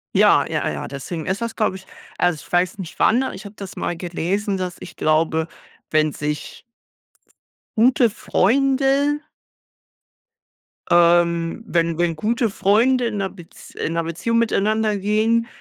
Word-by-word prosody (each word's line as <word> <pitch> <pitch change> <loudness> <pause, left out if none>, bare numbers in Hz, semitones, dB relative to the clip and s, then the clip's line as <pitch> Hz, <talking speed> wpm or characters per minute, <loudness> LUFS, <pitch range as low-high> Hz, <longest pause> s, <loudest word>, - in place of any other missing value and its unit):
Ja, - - +5
ja, - - -1
ja, - - -5
deswegen 155 +5 -6
ist 190 +1 -1
das, 230 0 -3
glaube 215 -4 0
ich 190 0 -11 0.3
also, 175 -4 0
ich - - -19
weiß 180 +1 +1
nicht 175 -4 -7
wann, 255 +4 +2
ich 190 +3 -10
habe 200 - -9
das 195 -3 -8
mal 175 - -3
gelesen, 185 +4 -2
dass 180 -2 -4
ich 175 - -10
glaube, 160 +1 +1 0.4
wenn 155 -1 +2
sich 150 0 -5 1.1
gute 240 +1 +4
Freunde 275 +7 +2 1.7
ähm, 170 +2 +3
wenn 170 -3 0
wenn 170 -1 +1
gute 225 +6 0
Freunde 235 +6 +2
in 220 -2 -3
'ner 195 -1 -1
Bez 175 -4 -14
in 165 - -3
'ner 165 0 0
Beziehung 180 +8 -1
miteinander 215 -1 +1
gehen, 215 +3 +1
190 Hz, 145 wpm, -21 LUFS, 170-225 Hz, 1.7 s, Ja